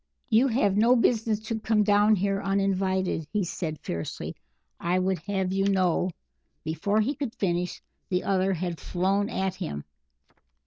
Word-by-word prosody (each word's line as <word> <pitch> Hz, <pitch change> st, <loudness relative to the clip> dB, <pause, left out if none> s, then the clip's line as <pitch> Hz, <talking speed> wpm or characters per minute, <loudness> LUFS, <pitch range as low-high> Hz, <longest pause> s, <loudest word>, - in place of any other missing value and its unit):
"You 230 Hz, +5 st, +5 dB
have 210 Hz, -5 st, +2 dB
no 235 Hz, +4 st, +5 dB
business 225 Hz, -3 st, +2 dB
to 220 Hz, +1 st, -3 dB
come 215 Hz, -1 st, +2 dB
down 205 Hz, +1 st, +4 dB
here 195 Hz, +1 st, 0 dB
uninvited," 190 Hz, -4 st, 0 dB
he 210 Hz, -2 st, +1 dB
said, 160 Hz, -2 st, -4 dB
fiercely. 85 Hz, -1 st, -5 dB, 0.4 s
"I 175 Hz, +2 st, +1 dB
would 185 Hz, -1 st, +1 dB
have 190 Hz, -2 st, 0 dB
you 195 Hz, 0 st, +1 dB
know 185 Hz, -2 st, +2 dB, 0.3 s
" -, -, -48 dB
Before 165 Hz, +7 st, 0 dB
he 255 Hz, +7 st, 0 dB
could 275 Hz, -6 st, -5 dB
finish, 180 Hz, -2 st, -1 dB, 0.3 s
the 180 Hz, -1 st, 0 dB
other 195 Hz, 0 st, +1 dB
had 175 Hz, -1 st, -3 dB
flown 195 Hz, +3 st, 0 dB
at 190 Hz, -4 st, -1 dB
him. 125 Hz, -, -5 dB
195 Hz, 160 wpm, -27 LUFS, 180-210 Hz, 0.4 s, You